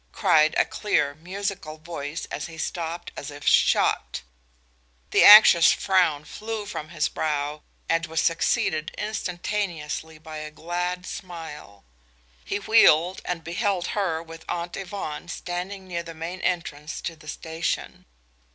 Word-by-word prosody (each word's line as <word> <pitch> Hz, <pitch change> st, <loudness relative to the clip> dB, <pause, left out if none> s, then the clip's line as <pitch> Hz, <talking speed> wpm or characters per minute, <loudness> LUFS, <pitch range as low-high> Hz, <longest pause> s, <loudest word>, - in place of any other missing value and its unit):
cried 155 Hz, -, +3 dB
a -, -, +4 dB
clear, 210 Hz, -9 st, 0 dB
musical 180 Hz, 0 st, -5 dB
voice, 155 Hz, -1 st, -6 dB
and -, -, -4 dB
he 165 Hz, -1 st, -10 dB
stopped 170 Hz, +1 st, -4 dB
as 140 Hz, -, -6 dB
if 145 Hz, 0 st, -10 dB
shot. -, -, +3 dB, 0.9 s
The -, -, +5 dB
anxious 205 Hz, -5 st, +10 dB
frown 170 Hz, -6 st, +2 dB
flew 220 Hz, -1 st, -5 dB
from 155 Hz, -6 st, -6 dB
his 155 Hz, -2 st, 0 dB
brow 150 Hz, -1 st, -2 dB, 0.3 s
and 165 Hz, 0 st, +1 dB
was 160 Hz, 0 st, -2 dB
succeeded 165 Hz, -1 st, +1 dB
instantaneously 175 Hz, -6 st, -3 dB
by 155 Hz, 0 st, -9 dB
a 155 Hz, 0 st, -6 dB
glad 175 Hz, +3 st, -3 dB
smile. 160 Hz, -, -8 dB, 0.6 s
He 200 Hz, -, -2 dB
wheeled 190 Hz, -4 st, +4 dB
and 170 Hz, -2 st, -3 dB
beheld 185 Hz, +1 st, -1 dB
her, 170 Hz, -6 st, -1 dB
with 165 Hz, 0 st, -11 dB
Aunt 175 Hz, 0 st, -3 dB
Yvonne, 185 Hz, -5 st, -5 dB
standing 185 Hz, +3 st, -5 dB
near 170 Hz, -2 st, -3 dB
the 165 Hz, -1 st, -9 dB
main 170 Hz, +3 st, -5 dB
entrance 160 Hz, -4 st, -2 dB
to 165 Hz, -, -4 dB
the 155 Hz, -1 st, -17 dB
station. 160 Hz, +1 st, -4 dB
170 Hz, 135 wpm, -25 LUFS, 155-185 Hz, 0.9 s, anxious